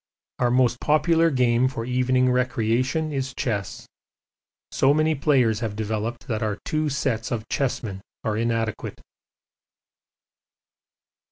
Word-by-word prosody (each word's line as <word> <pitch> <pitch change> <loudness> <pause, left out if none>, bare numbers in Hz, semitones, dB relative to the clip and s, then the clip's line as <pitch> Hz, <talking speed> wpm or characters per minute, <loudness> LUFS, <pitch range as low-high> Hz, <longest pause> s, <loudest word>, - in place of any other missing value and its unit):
Our 125 - +2
most 125 -1 +2
popular 165 +2 +3
game 125 -3 +2
for 115 -3 -4
evening 125 0 +2
recreation 125 +4 0
is 135 -2 -3
chess; 105 -6 -3 0.9
so 135 +2 +3
many 155 +1 +2
players 135 -7 +2
have 110 -3 -3
developed 110 +2 -3
that 110 -3 -2
our 105 -2 -1
two 155 0 0
sets 130 -4 -1
of 110 -3 -3
chessmen 110 -8 -2 0.2
are 110 -1 -1
inadequate. 115 -1 -2
125 Hz, 115 wpm, -24 LUFS, 115-135 Hz, 0.9 s, popular